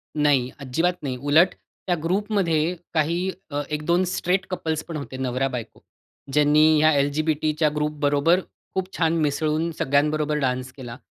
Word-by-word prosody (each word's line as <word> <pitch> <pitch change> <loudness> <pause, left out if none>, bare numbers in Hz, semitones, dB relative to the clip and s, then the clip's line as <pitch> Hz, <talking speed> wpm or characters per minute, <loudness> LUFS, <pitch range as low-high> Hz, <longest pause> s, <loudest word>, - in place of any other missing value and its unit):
नाही. 145 -4 +2
अजिबात 165 +6 -1
नाही. 130 -3 -2
उलट 145 +7 +4 0.3
त्या 175 - +2
ग्रुपमध्ये 180 -3 0 0.2
काही 170 +4 +1 0.2
अ, 145 0 -1
1-2 155 +4 +1
स्ट्रेट 185 +1 0
कपल्स 160 -4 -2
पण 165 - -6
होते, 140 -2 -7
नवरा-बायको. 130 -2 -3 0.5
ज्यांनी 150 +1 +5
या 155 +1 +5
एल-जी-बी-टीच्या 155 +2 +1
ग्रुपबरोबर 150 +2 +2 0.4
खूप 190 0 -2
छान 165 -1 +2
मिसळून 155 +2 0
सगळ्यांबरोबर 150 +2 +1
डान्स 130 -1 -1
केला. 120 -3 -8
150 Hz, 130 wpm, -23 LUFS, 145-170 Hz, 0.5 s, ज्यांनी